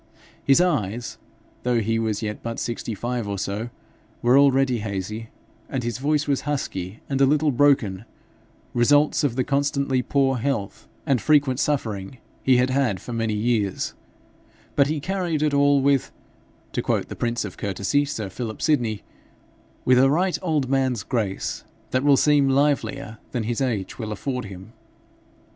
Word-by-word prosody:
His 135 +2 +5
eyes, 120 - 0 0.4
though 125 -1 +1
he 115 +1 0
was 110 -1 -1
yet 105 -1 -4
but 115 0 -4
sixty 115 -1 -3
five 120 +1 -3
or 100 -1 -3
so, 105 +5 -3 0.5
were 120 +2 +5
already 135 -3 +4
hazy, 105 +2 -4 0.4
and 130 -3 -2
his 120 +1 -3
voice 145 +1 +1
was 140 -2 +1
husky 110 -9 -4
and 135 -1 -1
a - - +7
little 150 +1 +3
broken 120 -7 +2 0.7
results 145 +6 +3
of 135 -5 +1
the 130 - +1
constantly 140 -1 0
poor 135 0 +1
health 115 -5 -3 0.2
and 130 -5 +2
frequent 140 -1 +3
suffering 110 -7 -2 0.2
he 130 -2 +4
had 125 +1 +2
had 130 -8 +1
for 120 - -7
many 115 -2 -1
years; 105 -3 0 0.8
but 140 -1 +4
he 155 +1 -1
carried 175 -2 -1
it 150 -1 +1
all 140 0 +4
'with' 140 -2 +2 0.6
to - - -1
quote - - 0
the - - -7
prince 120 -1 -1
of 100 - -7
courtesy, 100 +8 0
sir 115 -8 -4
Philip 110 +3 -6
Sydney 120 -9 +1 0.8
'with 125 0 +5
a 135 +1 +5
right 180 +5 +1
old 155 -7 0
man's 130 -5 +1
grace, 105 -4 -2 0.3
that 130 +1 +1
will 145 -1 +5
seem 145 -1 +4
livelier 140 -4 0
than 120 -3 -1
his 120 +3 -2
age 115 -7 -2
will 110 -2 -4
afford 125 +3 -3
him.' 95 +3 -10
125 Hz, 160 wpm, -24 LUFS, 110-140 Hz, 0.8 s, a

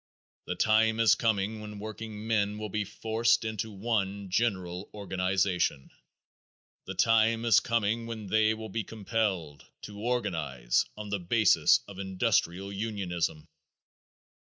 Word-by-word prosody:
The - - -2
time 110 +1 +3
is 115 -1 +6
coming 110 -1 0
when 105 -1 -8
workingmen 110 -1 -2
will 105 0 -5
be 105 +1 -2
forced 115 +2 +1
into 110 0 -3
one 100 -2 -2
general 95 -4 -1
organization. 95 -6 0 1.0
The - - -5
time 115 0 +3
is 115 - +6
coming 115 0 0
when 110 -2 -6
they 110 +2 +2
will 110 0 -7
be 115 - -2
compelled 100 -8 -2 0.2
to 105 -1 -9
organize 80 - 0
on 105 -1 -6
the 100 0 -1
basis 105 +4 +4
of 100 -2 -10
industrial 95 0 0
unionism. 90 -7 -3
105 Hz, 125 wpm, -29 LUFS, 95-110 Hz, 1.0 s, is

